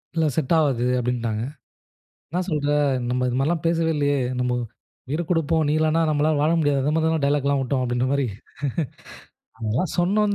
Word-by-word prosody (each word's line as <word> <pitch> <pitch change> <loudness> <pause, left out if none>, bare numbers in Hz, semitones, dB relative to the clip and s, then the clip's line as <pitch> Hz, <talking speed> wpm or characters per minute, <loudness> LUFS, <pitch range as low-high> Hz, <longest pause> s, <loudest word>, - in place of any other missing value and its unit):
இல்ல 165 -1 +2
செட் 160 0 +1
ஆவாது 135 -6 +2
அப்டின்னுட்டாங்க. 120 -3 -1 0.9
என்ன 175 - -1
சொல்ற? 150 -3 0 0.4
நம்ம 125 +1 0
இது 125 - -2
மாரில்லா 155 +6 +1
பேசவே 165 -1 +1
இல்லயே. 145 -1 +1 0.2
நம்மோ 125 0 0 0.5
உயிர 150 +5 -1
குடுப்போம், 165 -2 +2
நீ 145 - +2
இல்லனா 155 +1 +2
நம்மால 150 0 +2
வாழ 155 +2 +3
முடியாது. 145 -3 +2
அந்த 150 +2 +1
மாரிலா 160 0 +2
டயலாக்லா 140 0 +2
விட்டோம் 130 0 0
அப்டின்ற 120 +1 0
மாரி 140 -2 +1 1.3
அதெல்லாம் 115 +9 -1
சொன்னோம் 205 +4 +2
145 Hz, 155 wpm, -23 LUFS, 125-160 Hz, 1.3 s, வாழ